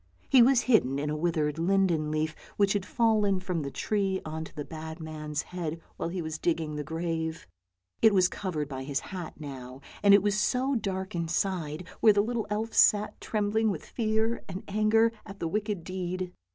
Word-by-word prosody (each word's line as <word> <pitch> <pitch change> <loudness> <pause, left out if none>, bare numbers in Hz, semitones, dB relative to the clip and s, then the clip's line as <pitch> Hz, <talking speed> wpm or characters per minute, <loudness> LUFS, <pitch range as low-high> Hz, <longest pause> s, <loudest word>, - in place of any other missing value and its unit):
He 260 -3 +7
was 250 +1 +6
hidden 180 - +3
in 150 +1 -1
a - - -1
withered 155 -2 0
linden 170 -3 +2
leaf 155 +1 -1 0.2
which 200 -1 +3
had 200 -1 -2
fallen 215 -5 +2
from 180 -3 -2
the 140 - -3
tree 195 +4 0
on 160 0 -4
to - - -14
the 145 -2 -5
bad 160 +1 -7
man's 155 -1 -4
head 165 -3 -5 0.2
while - - -2
he 175 0 -3
was 155 0 -4
digging 160 -3 -1
the 150 - -3
grave. 160 0 -3 0.6
It 220 - +7
was 185 -3 +4
covered 170 -7 -3
by 135 -2 -5
his 140 0 -1
hat 180 -5 -7
now, 130 -3 -8 0.2
and 200 -1 +8
it 200 - +4
was 205 -1 +2
so 255 +6 +1
dark 190 -5 -2
inside, 170 -1 -2
where 215 - +7
the 205 0 +3
little 235 0 -2
elf 220 +2 -2
sat 210 0 +4
trembling 215 +1 +1
with 180 -7 -4
fear 220 0 0
and 185 0 -5
anger 215 +2 +3
at 195 -1 -10
the 165 - -1
wicked 205 -1 -2
deed. 185 0 -4
185 Hz, 190 wpm, -29 LUFS, 160-210 Hz, 0.6 s, and